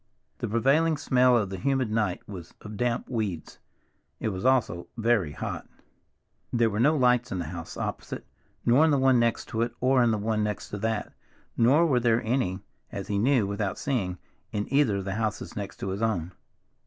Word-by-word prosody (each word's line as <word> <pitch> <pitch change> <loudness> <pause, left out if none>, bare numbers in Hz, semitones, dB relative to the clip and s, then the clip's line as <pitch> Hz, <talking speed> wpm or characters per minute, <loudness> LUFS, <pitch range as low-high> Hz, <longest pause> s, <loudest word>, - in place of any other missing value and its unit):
The - - -2
prevailing 140 +8 +2
smell 125 -3 +4
of 100 -4 -1
the 95 - -5
humid 135 -1 0
night 105 -5 -1
was 90 -4 -9
of 105 0 -8
damp 120 +2 -1
weeds. 105 -10 -4 0.6
It - - -1
was 95 -1 -5
also 125 -10 +2
very 110 -9 +1
hot. - - -5 0.8
There 115 -2 +2
were 105 - -2
no 150 +6 +4
lights 125 -1 +3
in 95 - -2
the 85 - -3
house 85 -2 -7
opposite, - - -5 0.4
nor 125 +6 +5
in 160 - +5
the 145 - +3
one 130 -2 +4
next 115 -1 +1
to 110 - -2
it, 120 0 0
or 130 0 +3
in 120 - +4
the 110 - +1
one 110 +1 0
next 105 -1 -3
to 105 - -5
that, 110 0 -2 0.4
nor 135 +9 +5
were 135 -6 +3
there 115 -1 +2
any, 110 -6 0 0.3
as - - -6
he 100 -1 0
knew 125 -1 +3
without 100 -1 -2
seeing, 100 -10 -1 0.3
in 105 0 -2
either 135 -7 +4
of 95 - -4
the 100 - -2
houses 110 -2 -3
next 100 -1 -5
to 95 - -2
his 95 +3 -3
own. 90 -7 0
115 Hz, 200 wpm, -27 LUFS, 100-125 Hz, 0.8 s, nor